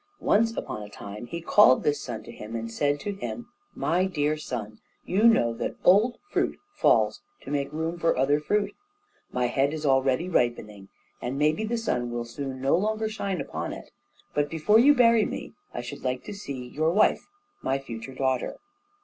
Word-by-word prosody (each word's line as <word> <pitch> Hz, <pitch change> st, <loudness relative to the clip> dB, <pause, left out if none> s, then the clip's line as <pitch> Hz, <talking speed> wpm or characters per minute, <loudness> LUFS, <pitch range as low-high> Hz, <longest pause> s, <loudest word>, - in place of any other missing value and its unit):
Once 225 Hz, +2 st, +2 dB
upon 105 Hz, -, -4 dB
a 105 Hz, -, -8 dB
time 105 Hz, +3 st, -8 dB
he 170 Hz, -, -5 dB
called 170 Hz, -5 st, +5 dB
this 145 Hz, 0 st, +1 dB
son 110 Hz, -4 st, -6 dB
to 120 Hz, -, -10 dB
him 110 Hz, 0 st, -8 dB
and 115 Hz, 0 st, -4 dB
said 145 Hz, +5 st, 0 dB
to 205 Hz, +7 st, -3 dB
him: 240 Hz, +4 st, -6 dB, 0.3 s
"My 180 Hz, +3 st, +1 dB
dear 155 Hz, -5 st, 0 dB
son! 110 Hz, -8 st, -6 dB, 0.3 s
you 200 Hz, +5 st, +2 dB
know 120 Hz, -, +4 dB
that 115 Hz, -, -4 dB
old 215 Hz, +6 st, +5 dB
fruit -, -, 0 dB, 0.2 s
falls -, -, +3 dB, 0.2 s
to -, -, -7 dB
make 140 Hz, -1 st, -1 dB
room 160 Hz, +2 st, -3 dB
for 165 Hz, -4 st, +2 dB
other 140 Hz, +3 st, +3 dB
fruit. 200 Hz, +6 st, 0 dB, 0.6 s
My 125 Hz, 0 st, 0 dB
head 135 Hz, +4 st, +1 dB
is 155 Hz, -1 st, -5 dB
already 135 Hz, +4 st, +2 dB
ripening, 105 Hz, -, -1 dB, 0.3 s
and 125 Hz, +3 st, -3 dB
maybe 155 Hz, +7 st, +2 dB
the 235 Hz, +2 st, -1 dB
sun 125 Hz, -, -1 dB
will 120 Hz, 0 st, -3 dB
soon 130 Hz, +2 st, -6 dB
no 135 Hz, +1 st, +3 dB
longer 215 Hz, +4 st, 0 dB
shine 200 Hz, -4 st, -3 dB
upon -, -, -4 dB
it; -, -, -10 dB, 0.4 s
but 145 Hz, 0 st, +1 dB
before 165 Hz, +7 st, +4 dB
you 290 Hz, +5 st, +7 dB
bury 230 Hz, -3 st, +5 dB
me, -, -, -5 dB, 0.2 s
I 120 Hz, -, -4 dB
should 120 Hz, -, -8 dB
like 125 Hz, 0 st, -2 dB
to 210 Hz, -, -7 dB
see 140 Hz, -11 st, -6 dB
your 155 Hz, +5 st, +1 dB
wife, 200 Hz, +6 st, +3 dB, 0.3 s
my 135 Hz, -, 0 dB
future 130 Hz, -1 st, -8 dB
daughter. 130 Hz, -1 st, -1 dB
145 Hz, 190 wpm, -26 LUFS, 125-195 Hz, 0.6 s, you